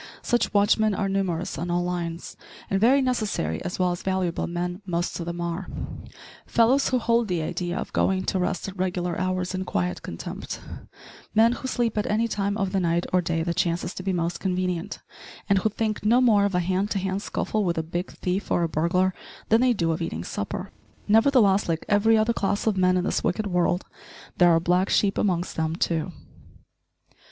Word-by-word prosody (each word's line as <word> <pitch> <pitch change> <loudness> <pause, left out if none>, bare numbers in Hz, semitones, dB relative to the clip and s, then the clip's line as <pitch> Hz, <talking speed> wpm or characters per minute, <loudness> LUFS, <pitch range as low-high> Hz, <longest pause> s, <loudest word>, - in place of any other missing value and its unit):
Such 240 - +1
watchmen 205 0 +3
are 195 - -1
numerous 185 -3 -2
on 175 - -3
all 175 0 +1
lines; 175 -1 -4 0.4
and 195 0 +1
very 265 +5 +5
necessary, 215 - -1
as 180 - -4
well 180 -1 +2
as 175 - -4
valuable, 185 -3 -1
men 175 +2 -3
most 175 -2 -2
of 170 - -5
them 170 0 -4
are 170 +2 -3 0.8
fellows 245 +4 +3
who 255 - +2
hold 235 -1 +2
the 175 -4 -1
idea 175 +2 -3
of - - -5
going 190 -1 +1
to 190 - -1
rest 180 +1 -1
at 195 - -7
regular 180 -2 -1
hours 185 0 -1
in 185 0 -2
quiet 90 - -2
contempt; 85 - -6 0.8
men 225 +2 +6
who 255 +2 -4
sleep 240 -3 0
at 210 - -1
any 220 +2 +2
time 200 -2 -1
of 195 -3 -1
the 195 - +1
night 170 -1 +1
or 180 - +4
day 165 -1 -1
that 170 0 -2
chances 175 +1 0
to - - -6
be 190 +1 -1
most 175 -1 -1
convenient, 180 -2 -2 0.5
and 200 -1 +4
who 220 - +1
think 215 0 -2
no 230 +4 +4
more 215 -5 +4
of 200 -2 -1
a 180 - +2
hand 190 +3 0
to 205 - -1
hand 190 +1 -2
scuffle 215 0 -1
with 170 -3 0
a 160 - 0
big 175 +3 -4
thief 185 +2 -3
or 175 - +2
a - - +2
burglar 180 +4 +1 0.4
than 225 +2 +5
they 255 0 +4
do 170 -8 +1
of 165 +2 -2
eating 85 - -3
supper. 185 - -5 0.4
Nevertheless, 215 -4 +4
like 165 -1 -1
every 220 +2 +4
other 220 +2 +2
class 200 -1 -1
of 220 -3 +2
men 185 -1 +3
in 180 - 0
this - - -1
wicked 215 - 0
world, 180 -1 +1 0.5
there 175 -1 +6
are 165 -1 +5
black 180 +3 +1
sheep 200 -1 +2
amongst 180 -3 0
them 160 0 0
too. 165 0 -1
185 Hz, 205 wpm, -25 LUFS, 175-205 Hz, 0.8 s, men